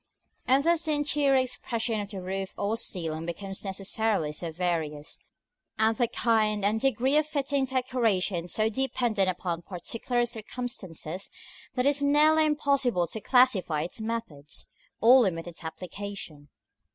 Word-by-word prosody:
And 265 +2 +4
thus 335 0 +3
the 315 -2 0
interior 290 -1 +2
expression 235 -3 0
of 200 - -7
the 195 -3 -7
roof 190 +1 -4
or 205 +2 0
ceiling 165 -6 -3
becomes 195 +3 -4
necessarily 195 -3 0
so 165 +2 -4
various, 160 -4 -2 0.6
and 220 +1 +3
the 240 +1 +2
kind 215 -3 +1
and 215 +2 +1
degree 265 +2 +2
of 305 0 +2
fitting 280 -2 0
decoration 230 -9 0
so 215 +4 +2
dependent 230 -4 0
upon 175 -2 -3
particular 230 +7 -2
circumstances, 215 -7 -5 0.5
that 250 0 +1
it - - +6
is 285 0 0
nearly 305 +2 +5
impossible 275 - +2
to 215 +6 -6
classify 200 - +3
its 180 +6 -6
methods, 220 -11 -5 0.4
or 250 +3 +8
limit 165 -7 0
its 175 -1 -7
application. 170 -3 -7
220 Hz, 140 wpm, -28 LUFS, 180-255 Hz, 0.6 s, or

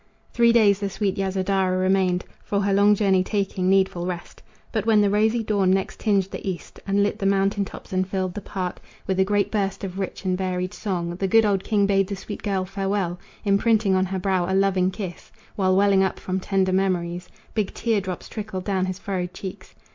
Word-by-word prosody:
Three 235 -1 +5
days 210 -4 +4
the 200 -1 -2
sweet 195 0 -1
Yasodhara 190 -1 0
remained, 185 -1 +1 0.2
For 200 - -1
her 200 0 +1
long 205 +1 +5
journey 195 -3 +3
taking 195 -2 -1
needful 190 -2 +2
rest. 175 -1 -6 0.3
But 220 -1 -2
when 220 -2 +5
the 205 -1 +3
rosy 220 +3 +2
dawn 200 -3 +1
next 190 0 0
tinged 200 -3 +2
the - - -6
east 185 -3 -5
And 200 +1 +2
lit 205 - -1
the 195 - +1
mountain 195 +1 +2
tops 190 - -10
and 185 0 +1
filled 185 -1 -2
the 205 - -5
park 185 -2 -4 0.2
With 190 0 -1
a - - +6
great 205 +1 +1
burst 195 -3 -1
of 190 0 -5
rich 190 0 -5
and 185 -1 +1
varied 185 -1 -2
song, 175 -5 -3
The 195 - 0
good 225 +3 +5
old 195 -2 +1
king 205 -3 +2
bade 195 -1 +2
the 200 - -3
sweet 200 +2 -7
girl 195 -3 -1
farewell, 195 -2 -2 0.3
Imprinting 205 0 +3
on 185 0 +2
her 190 +1 -3
brow 185 -1 0
a - - +2
loving 190 -1 +2
kiss, 190 -2 -7 0.2
While 185 -2 +2
welling 195 0 +4
up 190 - -1
from 185 0 -2
tender 190 0 +1
memories 180 -2 -1 0.2
Big 215 -3 -1
tear 225 -4 0
drops 185 -2 -6
trickled 205 -4 -5
down 190 -2 0
his 185 0 -3
furrowed 185 -3 -4
cheeks. 190 -2 -8
195 Hz, 210 wpm, -24 LUFS, 185-200 Hz, 0.3 s, a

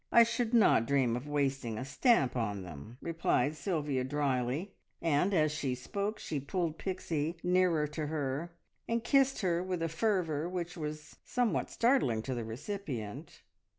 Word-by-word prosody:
I 235 - +8
should 235 0 -1
not 215 - +5
dream 130 -4 +2
of 125 +4 -5
wasting 135 -6 -1
a 130 - -4
stamp 140 - +3
on 105 -5 -1
them," 90 - -10
replied 160 -4 +1
Sylvia 145 -5 -1
drily, 140 +5 -1 0.3
and 165 +4 +2
as 155 -5 +3
she 140 -4 -1
spoke 200 - -3
she 150 - -3
pulled 165 +3 -2
Pixie 165 -4 -2
nearer 180 -3 +3
to 150 0 -3
her, 150 +2 -2 0.4
and 230 0 0
kissed 270 0 +3
her 175 -3 +1
with 180 -2 -2
a - - +1
fervour 170 -3 0
which 180 -1 -4
was 150 -2 -6
somewhat 245 -3 0
startling 185 - +2
to 130 - -3
the 120 -2 -3
recipient. 125 - -6
155 Hz, 155 wpm, -32 LUFS, 130-185 Hz, 0.4 s, I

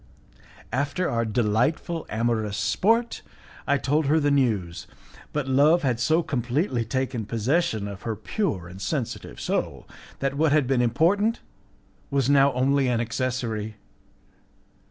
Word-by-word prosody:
After 145 +8 0
our 115 0 0
delightful 120 - 0
amorous 110 -2 -1
sport, 225 - +1 0.5
I 140 0 +3
told 145 +2 0
her 155 +3 +4
the 145 -1 +1
news, 110 -11 0 0.4
but 150 -3 -2
love 150 +6 +4
had 125 -4 0
so 160 +7 +2
completely 125 - -1
taken 130 0 -2
possession 115 -1 0
of 100 -1 -8
her 115 +1 -3
pure 105 - -2
and 95 +2 -11
sensitive 115 - -4
soul, - - -2 0.3
that 135 -1 -1
what 150 +1 +2
had 150 -3 +3
been 125 -1 +1
important 185 - +2 0.7
was 140 -1 +1
now 140 0 +5
only 135 +2 +2
an 120 -2 +1
accessory. 120 -3 -2
130 Hz, 135 wpm, -25 LUFS, 115-150 Hz, 0.7 s, now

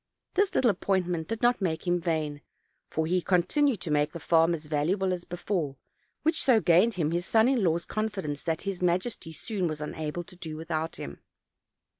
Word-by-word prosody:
This 400 0 +2
little 245 -4 +5
appointment 180 -4 -1
did 225 0 -4
not 240 -2 +3
make 170 -3 -1
him 175 0 +2
vain; 155 -4 -2 0.5
for 160 - -1
he 180 +3 +1
continued 195 - +2
to 160 - -3
make 150 0 +2
the 170 - -5
farm 165 +1 +3
as 155 -1 -9
valuable 175 +6 +1
as 175 -1 -5
before, 175 -5 -2 0.5
which 320 +1 +2
so 250 -4 +5
gained 190 +4 +4
him 160 -3 0
his 175 +1 -1
son 225 +1 +4
in 255 -5 +2
law's 170 -1 +1
confidence 195 -9 -3
that 165 -2 -2
his 195 -2 -3
majesty 180 0 0
soon 185 +2 -2
was 155 -2 -3
unable 150 +2 -4
to 180 - -13
do 160 -3 -7
without 160 0 -3
him. 70 - -7
175 Hz, 190 wpm, -28 LUFS, 160-200 Hz, 0.5 s, little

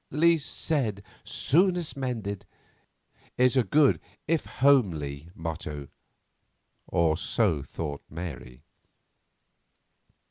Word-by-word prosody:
"Least 160 +1 +3
said, 115 -11 -1 0.2
soonest 175 +1 +2
mended," 115 -7 -4 0.9
is 125 +1 +4
a 130 - +5
good 145 +3 +4 0.3
if 165 0 +1
a - - -13
homely 85 - +2
motto, 75 -3 -5 1.0
or 80 -2 +2
so 90 -3 +1
thought 70 +1 -5
Mary. 65 -6 -7
100 Hz, 85 wpm, -28 LUFS, -, 1.0 s, a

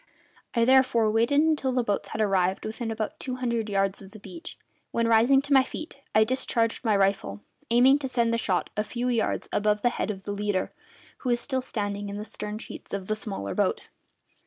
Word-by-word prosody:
I 235 -1 +4
therefore 255 -4 +4
waited 235 +6 +3
until 305 -5 +1
the 250 -1 +1
boats 205 -3 -1
had 220 - -3
arrived 190 -2 +1
within 225 +1 -4
about 220 -1 -4
two 255 -2 -4
hundred 235 -3 -2
yards 195 0 0
of 195 - -11
the 215 +2 -13
beach, 340 - -10 0.3
when, 230 0 0
rising 235 +5 +5
to 285 - 0
my 265 -1 +7
feet, 290 +1 -8
I 215 - +7
discharged 230 -1 0
my 220 -3 +2
rifle, 195 - 0 0.3
aiming 255 +4 +5
to 275 - -3
send 235 -2 +1
the 230 - +1
shot 185 -5 -1
a 210 - 0
few 240 +3 -3
yards 235 -3 0
above 210 0 +1
the 245 - +5
head 240 - -3
of 195 -2 -5
the 205 - -4
leader, 205 -2 -1 0.5
who 255 - -3
was 240 0 +2
still 260 0 -2
standing 205 -4 -3
in 200 - -5
the 210 - -5
stern 210 0 -6
sheets 220 - -7
of 195 -2 -5
the 215 - -1
smaller 195 - -5
boat. - - 0
225 Hz, 210 wpm, -26 LUFS, 205-250 Hz, 0.5 s, my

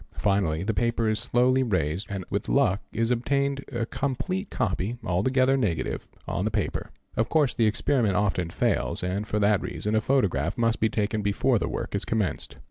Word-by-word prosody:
Finally 95 -5 +1
the 110 +3 0
paper 115 0 +1
is 110 0 +1
slowly 125 +2 +2
raised 90 - 0
and 95 -2 -4
with - - -2
luck 95 +3 +3
is 115 +1 0
obtained 140 +3 0
a 120 -3 -1
complete 185 - -2
copy, 115 -1 -1
altogether 130 +9 +2
negative, 105 - -1 0.2
on - - -1
the - - +1
paper. - - -2 0.3
Of 115 +2 +1
course 150 -5 +3
the 115 -2 +2
experiment 110 -1 +1
often 95 -3 +1
fails - - 0
and 95 +4 -2
for 105 - -1
that 105 -1 +3
reason 105 - -3
a 110 - +3
photograph 100 - +1
must 115 -1 +1
be 110 - +2
taken 105 0 -1
before 100 -1 +2
the - - -2
work - - -4
is - - -1
commenced. 110 -4 -2
110 Hz, 185 wpm, -26 LUFS, 100-125 Hz, 0.3 s, luck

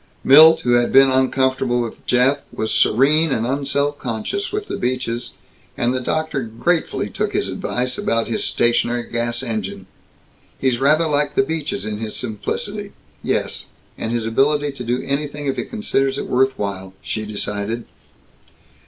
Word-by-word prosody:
Milt, 160 +4 +8
who 120 - 0
had 120 0 +3
been 135 0 +6
uncomfortable 130 -1 +1
with 120 -2 -5
Jeff, 130 +3 +3
was 110 - -2
serene 145 +7 +3
and 115 -3 0
un 140 +3 -1
self 140 +1 0
conscious 120 - -3
with 420 0 -3
the - - -3
Beaches, 125 -1 -2 0.4
and 120 +1 +1
the 130 - 0
doctor 155 +2 -1
gratefully 130 +9 -1
took - - -3
his - - 0
advice 125 0 -2
about 115 0 0
his 115 - -1
stationary 120 0 +1
gas 120 +1 -1
engine. 100 -5 -4 0.7
"He's 130 -3 0
rather 150 +5 +4
like 145 -1 0
the 200 - +4
Beaches 160 +2 -3
in 105 -1 -4
his 110 -1 -5
simplicity 205 - -4 0.3
yes, - - -2 0.3
and 115 - -4
his 120 -2 -1
ability 145 +5 +1
to 135 -2 -8
do 125 +2 -1
anything 145 +1 -3
if 135 - 0
he - - -3
considers 135 -11 -1
it - - -3
worth 130 +1 +1
while," 95 -2 -5
she 110 - -3
decided. 105 +2 -3
130 Hz, 160 wpm, -20 LUFS, 115-145 Hz, 0.7 s, Milt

